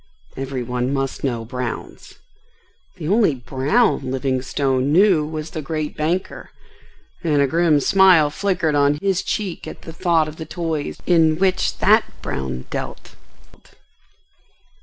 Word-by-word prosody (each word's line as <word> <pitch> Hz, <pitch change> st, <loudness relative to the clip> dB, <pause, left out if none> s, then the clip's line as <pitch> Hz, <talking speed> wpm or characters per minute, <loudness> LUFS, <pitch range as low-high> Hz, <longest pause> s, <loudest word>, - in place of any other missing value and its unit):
Every 135 Hz, -1 st, -4 dB
one 125 Hz, +1 st, -2 dB
must 135 Hz, -1 st, -3 dB
know 120 Hz, -4 st, -2 dB
"Brown's." 125 Hz, +1 st, -6 dB, 0.8 s
The 165 Hz, -5 st, -6 dB
only 200 Hz, -5 st, +3 dB
"Brown" 135 Hz, -, 0 dB
Livingstone 130 Hz, +1 st, -1 dB
knew 180 Hz, -2 st, +4 dB
was 155 Hz, 0 st, -6 dB
the 155 Hz, -, -4 dB
great 155 Hz, +1 st, -4 dB
banker, 170 Hz, +5 st, -2 dB, 0.7 s
and 150 Hz, -4 st, +2 dB
a 140 Hz, -, +4 dB
grim 160 Hz, +1 st, +3 dB
smile 180 Hz, -2 st, +5 dB
flickered 180 Hz, -3 st, 0 dB
on 145 Hz, 0 st, +3 dB
his 190 Hz, 0 st, 0 dB
cheek 190 Hz, -2 st, -4 dB
at -, -, -9 dB
the 165 Hz, -, -9 dB
thought 165 Hz, -3 st, +2 dB
of 155 Hz, +1 st, -9 dB
the 160 Hz, -, -6 dB
toys 160 Hz, -4 st, -3 dB
in 160 Hz, -3 st, +3 dB
which 185 Hz, 0 st, +1 dB
that -, -, +5 dB, 0.2 s
Brown 65 Hz, -1 st, -4 dB
dealt. -, -, -6 dB
155 Hz, 135 wpm, -21 LUFS, 135-175 Hz, 0.8 s, smile